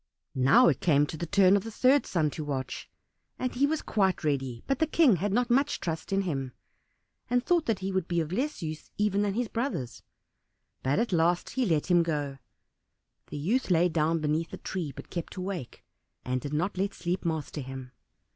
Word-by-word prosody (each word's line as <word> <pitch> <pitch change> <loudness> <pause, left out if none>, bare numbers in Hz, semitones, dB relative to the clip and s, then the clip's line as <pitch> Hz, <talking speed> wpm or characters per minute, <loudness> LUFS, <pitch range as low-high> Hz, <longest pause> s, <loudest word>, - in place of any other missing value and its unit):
Now 135 - +5
it - - +2
came 145 -4 +4
to 155 - -7
the 170 +2 -4
turn 195 +1 +5
of 200 - +1
the 225 - -6
third 260 +5 +3
son 155 -4 +1
to 155 - -5
watch; 135 -3 -4 0.5
and 255 -1 -2
he 275 +3 +2
was 315 +1 -1
quite 190 -5 +1
ready, 135 -5 -1
but 275 - 0
the 320 - +2
King 285 - +4
had 200 +4 -1
not 240 +3 +1
much 275 +3 +2
trust 165 +1 -4
in 195 0 +2
him, 135 -8 -3 0.8
and 245 0 +1
thought 345 -3 +2
that 225 -3 +1
he 195 - -1
would 190 -2 -1
be 170 -1 0
of 160 -1 -2
less 265 - -2
use 155 -1 -6
even 205 -1 +1
than 205 -1 0
his 245 0 0
brothers; 220 - -3 0.8
but 135 +2 +1
at 230 -2 0
last 170 +1 +2
he 260 -3 0
let 160 0 +1
him 175 -1 +6
go. 145 -4 -2 0.9
The - - -6
youth 210 - 0
lay 175 0 +4
down 160 0 +1
beneath 155 +2 0
the - - -7
tree, 170 -6 -4
but - - -11
kept 170 -2 -5
awake, 185 -8 -6 0.4
and 125 0 -1
did 140 - -5
not 175 +5 -1
let 195 +1 -1
sleep 175 +2 -2
master 160 -3 -3
him. 130 -1 -8
175 Hz, 205 wpm, -28 LUFS, 150-215 Hz, 0.9 s, him